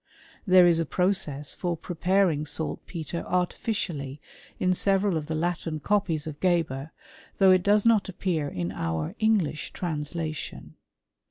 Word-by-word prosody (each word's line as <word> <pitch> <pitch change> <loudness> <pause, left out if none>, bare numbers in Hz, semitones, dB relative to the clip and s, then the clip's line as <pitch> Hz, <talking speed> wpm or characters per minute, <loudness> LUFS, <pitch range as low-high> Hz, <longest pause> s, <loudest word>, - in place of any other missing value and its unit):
There 185 -1 +7
is 170 -1 +4
a 165 - 0
process 180 -7 0
for 175 -2 -2
preparing 175 -2 +1
saltpetre 165 +1 -3
artificially, 175 - -2 0.4
in 185 0 +2
several 195 0 +2
of 155 -2 -3
the 160 - -2
Latin 165 -1 -2
copies 170 -3 0
of 155 -2 -7
Geber, 165 -6 0 0.5
though 190 -1 +6
it 185 -1 +5
doen 205 +3 +4
not 225 -4 +4
appear 175 -5 -1
in 90 -8 -3
our 80 -4 -3
English 205 -9 +1
translation. 155 -1 -4
170 Hz, 135 wpm, -27 LUFS, 150-185 Hz, 0.5 s, There